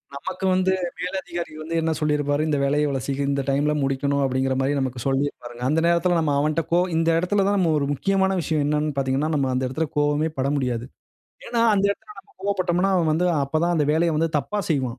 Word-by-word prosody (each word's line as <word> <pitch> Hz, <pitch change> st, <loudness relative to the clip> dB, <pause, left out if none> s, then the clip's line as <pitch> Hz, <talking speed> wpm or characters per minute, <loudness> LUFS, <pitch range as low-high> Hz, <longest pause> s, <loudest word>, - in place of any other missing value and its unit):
நமக்கு 140 Hz, +6 st, -5 dB
வந்து 185 Hz, 0 st, +2 dB, 0.3 s
மேலதிகாரி 180 Hz, -2 st, -4 dB
வந்து 160 Hz, +2 st, -6 dB
என்ன 160 Hz, 0 st, 0 dB
சொல்லிருப்பாரு. 150 Hz, -1 st, 0 dB
"இந்த 150 Hz, -2 st, +1 dB
வேலைய 145 Hz, +2 st, +2 dB
இவ்வளவு 135 Hz, -3 st, -2 dB
சீக்கிரம் 140 Hz, 0 st, -2 dB
இந்த 140 Hz, 0 st, 0 dB
டைம்ல 145 Hz, +2 st, +1 dB
முடிக்கணும்" 140 Hz, +1 st, 0 dB
அப்டின்கிற 130 Hz, 0 st, 0 dB
மாரி 135 Hz, +2 st, +1 dB
நமக்கு 130 Hz, -2 st, -3 dB
சொல்லிருப்பாருங்க. 135 Hz, -3 st, -2 dB
அந்த 155 Hz, +3 st, +2 dB
நேரத்ல 170 Hz, +1 st, +2 dB
நம்ம 155 Hz, -3 st, +1 dB
அவன்கிட்ட 155 Hz, +3 st, 0 dB
கோ 170 Hz, -, +4 dB, 0.2 s
இந்த 165 Hz, 0 st, +2 dB
எடத்துல 195 Hz, +4 st, +1 dB
தான் 205 Hz, 0 st, +2 dB
நம்ம 175 Hz, -4 st, +2 dB
ஒரு 140 Hz, -, 0 dB
முக்கியமான 190 Hz, +5 st, +1 dB
விஷயம் 155 Hz, -1 st, 0 dB
என்னன்னு 150 Hz, 0 st, 0 dB
பாத்தீங்கன்னா, 135 Hz, +3 st, 0 dB
நம்ம 135 Hz, -2 st, +1 dB
அந்த 130 Hz, +1 st, 0 dB
எடத்துல 155 Hz, +5 st, -2 dB
கோவமே 145 Hz, +2 st, +2 dB
பட 130 Hz, +1 st, 0 dB
முடியாது. 125 Hz, -4 st, -1 dB, 0.6 s
ஏன்னா 235 Hz, -, -1 dB
அந்த 195 Hz, -1 st, +1 dB
எடத்துல 210 Hz, +1 st, -7 dB
நம்ம -, -, -15 dB
கோவப்பட்டோம்ன்னா, 190 Hz, -1 st, +1 dB
அவன் 165 Hz, -3 st, +2 dB
வந்து 170 Hz, +3 st, +1 dB, 0.2 s
அப்ப 140 Hz, -, -14 dB
தான் 175 Hz, 0 st, +1 dB
அந்த 150 Hz, -2 st, +2 dB
வேலைய 165 Hz, +1 st, +2 dB
வந்து 165 Hz, +1 st, +1 dB
தப்பா 205 Hz, +8 st, -3 dB
செய்வான். 130 Hz, -5 st, -1 dB
150 Hz, 205 wpm, -23 LUFS, 140-175 Hz, 0.6 s, கோ